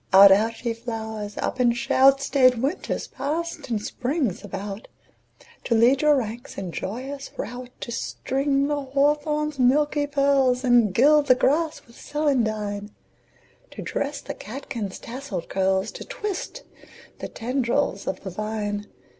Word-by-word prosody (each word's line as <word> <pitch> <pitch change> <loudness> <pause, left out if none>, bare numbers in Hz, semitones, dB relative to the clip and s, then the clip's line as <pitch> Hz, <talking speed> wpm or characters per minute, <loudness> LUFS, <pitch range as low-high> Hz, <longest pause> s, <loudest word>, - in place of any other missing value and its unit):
Out, 195 +1 +9
out, 225 +4 +2
ye 235 - +1
flowers! 220 -3 -6
Up - - -2
and 240 -1 +3
shout! 270 +2 +4
Staid 255 -3 +4
Winter's 280 +9 -2
passed 330 0 -4
and 225 -3 0
Spring's 250 - -2
about 205 +1 -6 0.8
To 230 - +2
lead 245 +4 +4
your 300 -1 +5
ranks 235 -2 -4
in 190 -3 -4
joyous 265 +11 -5
rout; 245 +1 -6
To 235 - -5
string 275 +3 -1
the 290 0 -1
hawthorn's 295 +2 0
milky 290 +3 +3
pearls, 275 -3 +2
And 240 -5 +4
gild 290 +7 +5
the 255 - +7
grass 305 +5 +1
with 235 - -18
celandine; 215 -9 -1 0.8
To - - -8
dress 285 +1 -3
the - - -6
catkins' 220 -3 -6
tasselled 235 -8 -6
curls, 190 0 +1
To - - -8
twist 420 -6 -5 0.6
the - - -4
tendrils 240 -5 -1
of - - -3
the 190 - -6
vine. 210 +1 -3
250 Hz, 140 wpm, -24 LUFS, 215-280 Hz, 0.8 s, Out